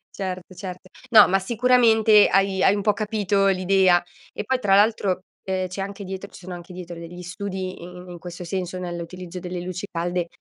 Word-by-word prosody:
Certo, 185 -1 -5
certo. 185 -1 -8 0.2
No, 215 -3 +8
ma 195 +1 +2
sicuramente 225 -1 +5
hai 195 0 +2
hai 195 - +5
un 205 - -3
po' 210 - +3
capito 205 -2 0
l'idea. 185 -1 +3 0.3
E - - -5
poi 260 +1 0
tra 195 -4 +3
l'altro, 200 -3 +2 0.2
ehm, 185 -1 -2
c'è 185 +2 -6
anche 200 +1 -6
dietro 190 +1 -6
ci - - -14
sono 180 0 -8
anche 175 +1 -10
dietro 175 -1 -8
degli 175 +1 -9
studi 185 0 -5
i - - -9
i 180 0 -10
in 175 - -9
questo 175 +1 -8
senso, 185 +1 -4
nell'utilizzo 180 0 -6
delle 180 0 -5
luci 185 +2 -5
calde 175 0 -2
185 Hz, 195 wpm, -23 LUFS, 180-200 Hz, 0.3 s, No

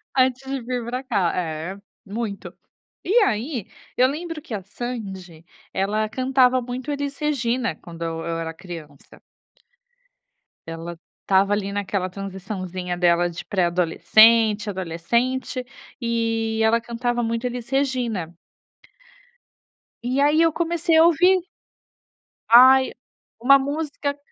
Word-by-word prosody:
Antes 260 0 +2
de 270 -2 -2
vir 245 0 -3
para 250 +3 -4
cá 195 -9 +1
é, 170 +2 -4 0.3
muito. 205 0 -5 0.5
E 400 - -1
aí, 240 - -2 0.3
eu 255 +1 +5
lembro 320 +2 -5
que 255 - -9
a 200 - -3
Sandy, 190 -7 -7 0.3
ela 210 +3 0
cantava 255 0 +3
muito 250 +4 -5
Elis 285 -1 -3
Regina 255 - -1
quando 170 +1 -12
eu 165 0 -3
eu 165 0 -2
era 165 0 -4
criança. 160 -5 -11 1.5
Ela 165 +1 -7 0.2
estava 195 +1 +3
ali 200 -1 -1
naquela 200 -2 -2
transiçãozinha 185 -2 -5
dela 175 0 +3
de 170 - -8
pré-adolescente, 210 +4 +4
adolescente, 235 - -2 0.4
e 225 -1 -1
ela 230 +1 +3
cantava 240 +1 -2
muito 230 +2 -2
Elis 245 -1 -6
Regina. 245 - -1 1.7
E 255 +3 0
aí 295 +3 +4
eu 330 - +3
comecei 335 0 0
a 320 - +8
ouvir 360 +3 +5 1.1
Ai, 260 +2 +7 0.5
uma 275 +3 +7
música 285 0 -3
230 Hz, 120 wpm, -23 LUFS, 185-260 Hz, 1.7 s, a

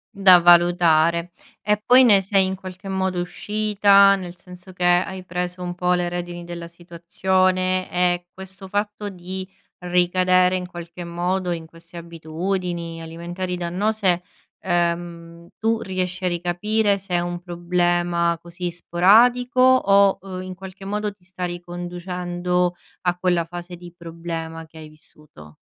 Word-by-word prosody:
Da 190 -2 +7
valutare. 170 -1 +4 0.3
E 210 +1 +3
poi 250 +3 +6
ne 205 -6 +6
sei, 195 0 +2
in 190 - -2
qualche 185 +1 -9
modo, 190 -1 -1
uscita? 200 +2 +3
Nel 180 -2 -8
senso 180 +1 -13
che, 180 -1 -6
hai 180 +1 +1
preso 180 0 -4
un 175 0 -4
po' 180 0 0
le 175 -1 0
redini 175 0 -5
della 170 -1 -7
situazione? 185 +2 -1
E 175 0 0
questo 190 0 -9
fatto 205 +1 -3
di, 185 0 -7 0.3
ricadere 180 +1 +2
in 180 -1 -3
qualche 175 0 -9
modo 175 +2 -2
in 165 -1 -4
queste 170 +1 -15
abitudini 170 +1 -4
alimentari 175 +3 -5
dannose, 185 +1 0 0.4
uhm, 170 -1 -2
tu 225 0 0
riesci 185 0 -3
a - - +3
ricapire 200 +4 0
se 190 -2 -4
è - - +3
un 175 0 -4
problema, 175 -1 0
così, 175 +1 -6
sporadico? 230 +9 +3
O, 200 -7 +5 0.2
in 185 0 -7
qualche 190 +1 -11
modo, 210 +1 -2
ti 195 -2 -25
sta 180 0 -6
riconducendo 175 0 -3 0.3
a 180 -1 0
quella 175 -2 +1
fase 175 +1 -8
di 175 0 -12
problema 165 -1 -7
che 160 - -17
hai 155 -1 -10
vissuto? 150 - -17
180 Hz, 140 wpm, -22 LUFS, 175-190 Hz, 0.4 s, Da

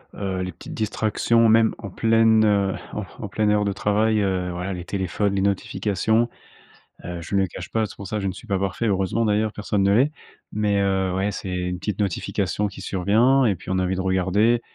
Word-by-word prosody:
heu, 95 -2 -3
les 90 - -3
petites 85 - -10
distractions, 110 +1 +1
même, 110 0 +4
en 100 - -7
pleine, 110 +1 +4
heu, 100 -2 +2 0.2
en 105 - -3 0.2
en 105 - -4
pleine 105 +2 0
heure 105 0 +2
de 100 - 0
travail, 105 +2 +1
heu, 95 -2 -1
voilà, 90 +2 -4
les 90 -1 -6
téléphones, 100 +2 -1
les 95 - +1
notifications. 100 +3 0 0.8
Heu, 85 -1 -5
je 90 - -4
ne 100 - +4
le 95 - +1
cache - - -8
pas, 110 -1 +1
c'est - - -10
pour 100 - -8
ça, 105 +2 -2
je 95 - -2
ne 95 - -2
suis 115 - -12
pas 100 -3 0
parfait, 100 +4 -1
heureusement, 95 +3 +1
d'ailleurs, 105 0 +1
personne 105 -1 -1
ne 100 +1 +4
l'est. 130 +8 +3 0.4
Mais 105 -1 +1
heu, 95 -1 +1
ouais, 95 +2 0
c'est 95 -2 -5
une 90 0 -3
petite 105 +3 -4
notification 100 +1 -1
qui 100 - -10
survient 115 +8 +3
et 105 -4 +2
puis 90 - -11
on 95 - +1
a - - +1
envie 90 +1 0
de 95 - -2
regarder 95 +5 +2
100 Hz, 225 wpm, -23 LUFS, 95-110 Hz, 0.8 s, même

